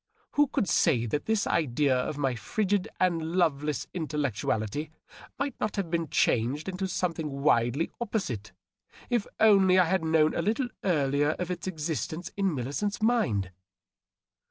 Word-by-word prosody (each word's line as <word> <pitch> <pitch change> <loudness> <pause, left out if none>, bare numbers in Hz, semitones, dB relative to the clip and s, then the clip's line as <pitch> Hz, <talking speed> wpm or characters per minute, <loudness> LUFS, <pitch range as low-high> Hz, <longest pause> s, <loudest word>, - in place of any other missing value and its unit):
Who 290 0 +3
could 255 -6 -1
say 135 -7 +3
that 145 +6 -2
this 220 -2 +1
idea 140 -2 +1
of 125 +3 -2
my 135 -3 0
frigid 200 - -1
and 175 -3 +2
loveleas 150 -5 +1
intellectu 150 - -2
ality 110 +8 -1 0.5
might 280 -1 -2
not 215 - -2
have 190 -5 -3
been 165 -3 -1
changed 130 +8 +1
into 190 0 -2
something 170 -4 -2
widely 140 0 +1
opposite, 135 - -3 0.6
if 240 -4 +1
only 195 -4 +6
I 185 - +6
had 185 0 +1
known 160 -1 +3
a - - 0
little 230 +7 0
earlier 145 -4 +2
of 180 0 -3
its 180 +1 -5
existence 160 0 -3
in 195 -5 0
Millicent's 145 - -2
mind 215 - +1
165 Hz, 150 wpm, -28 LUFS, 140-190 Hz, 0.6 s, only